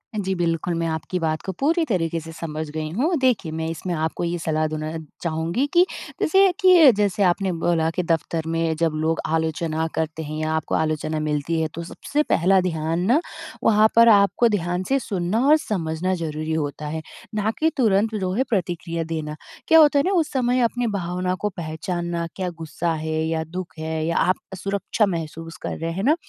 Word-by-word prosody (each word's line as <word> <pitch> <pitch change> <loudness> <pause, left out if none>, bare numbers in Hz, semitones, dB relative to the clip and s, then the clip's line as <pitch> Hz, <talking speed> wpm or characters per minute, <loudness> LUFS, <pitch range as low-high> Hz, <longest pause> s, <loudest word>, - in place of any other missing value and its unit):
हाँ 210 - 0
जी, 190 0 -1
बिल्कुल। 170 0 -1
मैं 165 - 0
आपकी 160 +3 -3
बात 160 -1 -1
को 190 - -2
पूरी 325 +5 +2
तरीके 170 - -1
से 165 0 -9
समझ 155 -1 -5
गई 155 0 -3
हूँ। 320 +8 +2
देखिए, 245 -11 +1
मैं 160 0 -3
इसमें 165 +2 -4
आपको 160 +1 -2
ये 170 0 -1
सलाह 155 -1 0
देना 155 0 -4 0.3
चाहूँगी 170 - -1
कि 350 +1 +6 0.4
जैसे 385 +3 +5
कि 355 -7 +8
जैसे 205 -1 +1
आपने 190 +1 +2
बोला 165 -1 +1
कि 180 - 0
दफ़्तर 165 -1 -1
में 165 0 0
जब 165 -1 +2
लोग 160 +1 0
आलोचना 160 0 -1
करते 160 0 -2
हैं 155 0 -5
या 155 0 -1
आपको 160 -1 -1
आलोचना 155 0 -1
मिलती 155 +2 -1
है 160 - +1
तो 170 - -4
सबसे 290 - -2
पहला 190 - +3
ध्यान 165 -2 -1
ना 245 +9 +4 0.4
वहाँ 215 0 +5
पर 230 0 +7
आपको 205 +3 +5
ध्यान 180 -3 -1
से 275 +1 +3
सुनना 200 -3 -1
और 305 +2 +7
समझना 185 - -2
ज़रूरी 155 -2 -3
होता 150 -1 -3
है, 160 +2 -3 0.3
ना 215 +1 +1
कि 320 - +3
तुरंत 220 -2 +2
जो 190 -3 -1
है 245 +7 +2
प्रतिक्रिया 175 -5 -2
देना। 155 -2 -4 0.3
क्या 325 - +7
होता 295 -2 +6
है - - +3
ना - - +2
उस 310 -2 -1
समय 250 -2 +1
अपने 240 +1 +1
भावना 180 -3 -2
को 210 - 0
पहचानना 170 +1 -3
क्या 185 -2 -2
गुस्सा 165 +1 -2
है 155 0 -2
या 160 0 -1
दुःख 175 +2 -7
है 160 0 -2
या 170 - 0
आप 185 - +3 0.2
सुरक्षा 200 +3 0
महसूस 165 -2 -5
कर - - -4
रहे 165 0 -3
हैं 190 +4 -3
ना? 295 +7 +4
170 Hz, 200 wpm, -23 LUFS, 160-205 Hz, 0.4 s, कि